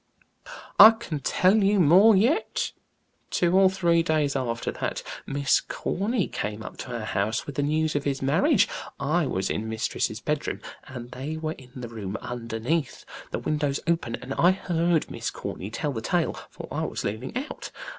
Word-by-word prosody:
"I 220 +3 +12
can 175 -10 -4
tell 190 +9 +3
you 200 +1 +3
more 185 +7 +7
yet. 245 - +1 0.6
Two 175 0 +2
or 190 0 +6
three 170 -3 +2
days 155 -4 +1
after 120 -3 -2
that, - - -3 0.2
Miss 140 0 +2
Corny 205 +2 -1
came 105 +1 -4
up - - -9
to 125 - -6
our 110 -2 -4
house 110 +1 -1
with 145 - -6
the 145 - -1
news 155 +2 +1
of 145 - 0
his 140 -1 0
marriage. 200 - +3 0.3
I 155 +2 +1
was 95 -4 -1
in 110 +1 -2
mistress's 110 0 -2
bedroom, - - -2 0.3
and 120 -2 -8
they 145 +5 -5
were 160 0 -3
in 130 -4 -15
the 125 -2 -6
room 110 -3 -5
underneath, 120 +5 -3 0.2
the - - -3
windows 145 -2 -1
open, 165 -9 0
and 130 +2 -6
I 175 +6 +4
heard 170 -3 0
Miss - - -3
Corny 95 - -6
tell 145 +6 -2
the 115 -4 -4
tale, - - 0 0.2
for - - -9
I - - -2
was - - -4
leaning 110 - -3
out. 280 +4 -5
150 Hz, 175 wpm, -26 LUFS, 120-180 Hz, 0.6 s, I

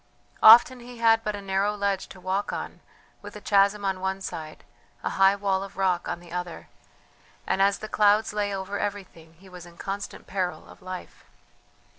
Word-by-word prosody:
Often 240 +3 +8
he 245 0 -11
had 225 -1 +3
but 210 -1 -2
a 200 - -8
narrow 195 +2 0
ledge 200 -2 -1
to 190 - -13
walk 190 +2 -2
on, - - -6 0.4
with - - -10
a - - -7
chasm 200 0 +2
on 190 -1 -1
one 190 +1 -2
side, 155 -5 -7 0.4
a - - -2
high 195 +1 +4
wall 195 -1 0
of 195 0 -11
rock 185 -3 0
on 170 - -3
the 175 -1 -15
other; 180 -1 -6 0.8
and 190 - 0
as 200 0 +3
the 215 - -7
clouds 210 0 +3
lay 205 -1 -1
over 195 +1 -4
everything 185 -5 -6
he 190 +4 -18
was 180 -2 -11
in 170 0 -17
constant 200 +2 -6
peril 185 -2 -3
of - - -16
life. 185 0 -9
195 Hz, 190 wpm, -26 LUFS, 185-205 Hz, 0.8 s, Often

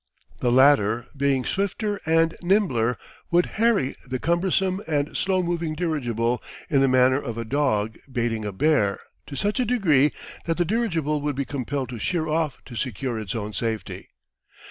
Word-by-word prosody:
The 120 - +1
latter, 120 -4 +4
being 135 -2 +1
swifter 200 +1 -1
and 165 0 +3
nimbler, 175 - +2 0.3
would 175 +1 +4 0.2
harry 225 - +3
the 130 0 -3
cumbersome 185 +5 +1
and 150 -2 -1
slow 190 -1 +1
moving 170 -2 -2
dirigible 125 -8 -1 0.3
in 140 -3 +4
the 135 - +4
manner 130 +1 +4
of 120 -4 -5
a 115 - -3
dog 110 -5 0
baiting 115 -3 -1
a 105 - -3
bear 100 -3 +2 0.3
to 140 - -7
such 205 - -1
a - - +3
degree 165 - +3 0.3
that 165 -1 -1
the 175 - +2
dirigible 165 -8 0
would 145 -1 -2
be 140 0 -2
compelled 135 0 -3
to 120 -2 -6
sheer 165 +2 -1
off 155 -3 0
to 125 - -10
secure 120 0 -3
its 110 +2 -5
own 105 -1 -4
safety. 110 -1 -4
140 Hz, 165 wpm, -24 LUFS, 120-170 Hz, 0.3 s, latter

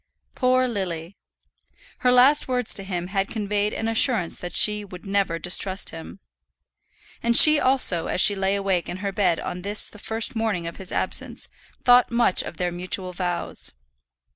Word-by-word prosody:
Poor 255 0 +1
Lily! 185 -5 -5 0.8
Her 250 - +2
last 260 +4 +4
words 250 -3 0
to 195 - -1
him 180 -3 -5
had 195 0 -2
conveyed 210 -1 -2
an 225 - -4
assurance 225 -5 +1
that 180 - -7
she 210 0 +4
would 185 -2 -13
never 195 -4 -1
distrust 185 +2 0
him. 165 +4 -11 1.0
And 235 0 +3
she 305 -1 +8
also, 255 - +2
as - - -2
she 205 - +7
lay 195 0 -1
wakeful 190 -3 -2
in - - -8
her 200 +1 -4
bed 190 -5 0
on 180 - -6
this 205 +3 +2
the 210 - -15
first 225 +2 0
morning 220 -6 -2
of 170 - -8
his 190 -1 -8
absence, - - -1 0.4
thought 245 0 +5
much 235 -5 +1
of 165 - -9
their 180 -1 -2
mutual 180 +1 -5
vows. 175 -1 -4
200 Hz, 170 wpm, -22 LUFS, 180-225 Hz, 1.0 s, she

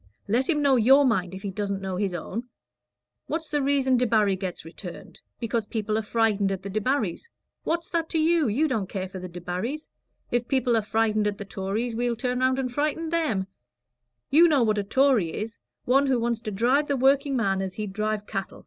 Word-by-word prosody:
Let 240 +6 +1
him 300 -3 +2
know 275 -2 +4
your 270 +5 +6
mind 190 -7 0
if 190 - -9
he 200 - -3
doesn't 200 0 -2
know 190 -1 -4
his 190 -2 -1
own. 210 +8 -5 0.8
What's 320 +1 -3
the 295 -1 0
reason 270 -2 +2
Debarry 215 -5 +3
gets 185 -3 -5
returned? 175 +2 -10 0.2
Because 230 -2 -2
people 215 -1 -2
are 220 - +1
frightened 210 -2 +1
at 190 -1 -4
the 200 - -5
Debarrys. 215 - -1 0.4
What's 335 0 -1
that 330 -2 -1
to - - -1
you? 320 -2 +3
You 265 +9 +2
don't 220 -9 -2
care 190 -2 -3
for 185 0 -8
the 185 0 -7
Debarrys. 180 - -4 0.4
If 240 0 0
people 255 -3 +2
are 225 - +3
frightened 215 0 +1
at 205 -1 -2
the 205 - -7
Tories, 205 +5 -3
we'll 240 0 0
turn 250 +1 -2
round 260 0 +2
and 255 -2 -2
frighten 305 +4 -1
them. 310 - 0 0.9
You 330 +5 +7
know 290 -6 +3
what 215 -2 +2
a - - -1
Tory 240 -6 +2
is 220 +2 -5 0.3
one 275 +3 +3
who 260 -2 +2
wants 235 -1 -1
to 220 -3 -4
drive 250 +9 +2
the 280 - 0
workingman 260 -7 +2
as 190 -1 -4
he'd 210 -3 -4
drive 215 0 -2
cattle. 195 -2 -5
225 Hz, 205 wpm, -26 LUFS, 200-270 Hz, 0.9 s, You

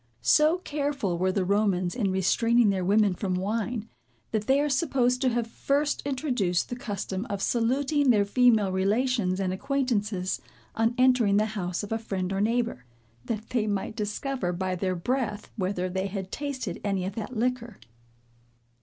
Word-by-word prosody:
So 305 - +5
careful 285 - -2
were 185 +1 +2
the 185 -1 0
Romans 195 -3 +1
in 215 -6 0
restraining 225 +4 +3
their 190 -2 -1
women 205 +1 +3
from 185 0 -2
wine, 220 +4 -2 0.4
that 215 -1 -1
they 270 +1 +4
are 295 - +2
supposed 260 -4 +1
to 260 - +3
have 240 -1 0
first 280 +5 0
introduced 250 - 0
the 245 - -3
custom 205 -2 -4
of 200 - -2
saluting 265 +6 +1
their 210 -4 +4
female 220 -3 +4
relations 200 0 +1
and 185 -1 0
acquaintances, 210 -6 -1 0.3
on 225 +1 +1
entering 250 -5 +4
the 215 - +3
house 180 -2 -3
of 205 - -7
a 225 - 0
friend 195 -4 -3
or 195 - 0
neighbor, 230 - 0 0.4
that 220 -1 -4
they 230 -4 +1
might 205 +1 -2
discover 210 -1 -2
by 185 +1 -2
their 185 0 -1
breath, 210 +2 -2
whether 185 -2 -1
they 190 +1 -2
had 190 -1 -5
tasted 285 -3 -4
any 195 -3 -1
of 190 - -3
that 225 +3 -5
liquor. 240 -2 -1
215 Hz, 165 wpm, -27 LUFS, 190-250 Hz, 0.4 s, So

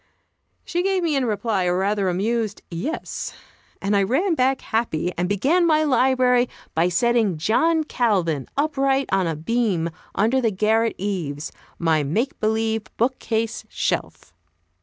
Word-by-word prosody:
She 345 - -1
gave 380 -1 +1
me 320 -3 +1
in 270 -2 +1
reply 210 -3 0
a 180 0 +1
rather 195 +1 +1
amused 215 +4 -1
"Yes," 205 - -4 0.5
and 200 +1 +1
I 200 - +4
ran 280 - +1
back 265 -2 +1
happy, 180 -6 -1
and 180 +1 -1
began 275 - +2
my 310 -2 +3
library 255 -3 +3 0.2
by 165 +2 +2
setting 220 0 +2
John 315 - +2
Calvin 185 - 0
upright 275 -2 +1
on 190 -2 +2
a 165 - -1
beam 175 -1 0 0.2
under 240 +5 +2
the 230 - +2
garret 220 +3 +1
eaves, 165 -7 -3 0.3
my 160 -2 +2
"make 215 - -1
believe" 220 0 0
book 255 +3 +1
case 225 0 -2
shelf. - - -3
220 Hz, 145 wpm, -23 LUFS, 185-260 Hz, 0.5 s, I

